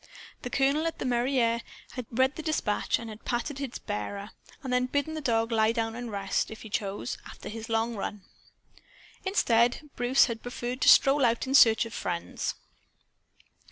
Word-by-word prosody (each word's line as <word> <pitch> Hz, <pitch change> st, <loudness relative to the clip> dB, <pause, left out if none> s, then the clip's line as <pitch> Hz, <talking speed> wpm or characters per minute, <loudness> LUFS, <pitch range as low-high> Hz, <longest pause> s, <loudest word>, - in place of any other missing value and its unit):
The 245 Hz, -, -5 dB
colonel, 275 Hz, +5 st, +2 dB
at 330 Hz, -, -4 dB
the -, -, -4 dB
mairie, 250 Hz, +2 st, +1 dB, 0.5 s
had 250 Hz, -3 st, -6 dB
read 260 Hz, +4 st, +2 dB
the -, -, -5 dB
dispatch 310 Hz, -10 st, 0 dB
and 230 Hz, -, -8 dB
had 215 Hz, 0 st, -10 dB
patted 265 Hz, +3 st, -2 dB
its 265 Hz, -3 st, -4 dB
bearer; 200 Hz, -, -5 dB, 0.3 s
then 260 Hz, -, -4 dB
had 250 Hz, 0 st, +1 dB
bidden 285 Hz, +2 st, 0 dB
the 310 Hz, -, -4 dB
dog 225 Hz, -3 st, +1 dB
lie 220 Hz, -1 st, +3 dB
down 225 Hz, -1 st, -1 dB
and 240 Hz, -1 st, -6 dB
rest, 195 Hz, -1 st, -1 dB
if 220 Hz, -, -9 dB
he 220 Hz, -, -10 dB
chose, 200 Hz, +4 st, -3 dB
after -, -, -9 dB
his 225 Hz, +2 st, -7 dB
long 225 Hz, +1 st, 0 dB
run. 200 Hz, -1 st, -5 dB, 1.0 s
Instead, 245 Hz, -, +2 dB
Bruce 245 Hz, +2 st, +4 dB
had 230 Hz, -2 st, -5 dB
preferred 245 Hz, +1 st, -5 dB
to -, -, +6 dB
stroll 275 Hz, -1 st, +6 dB
out 235 Hz, -1 st, +2 dB
in 265 Hz, -, -3 dB
search 225 Hz, -4 st, +7 dB
of 230 Hz, -, -9 dB
friends. 170 Hz, -3 st, -3 dB
240 Hz, 180 wpm, -28 LUFS, 225-265 Hz, 1.0 s, search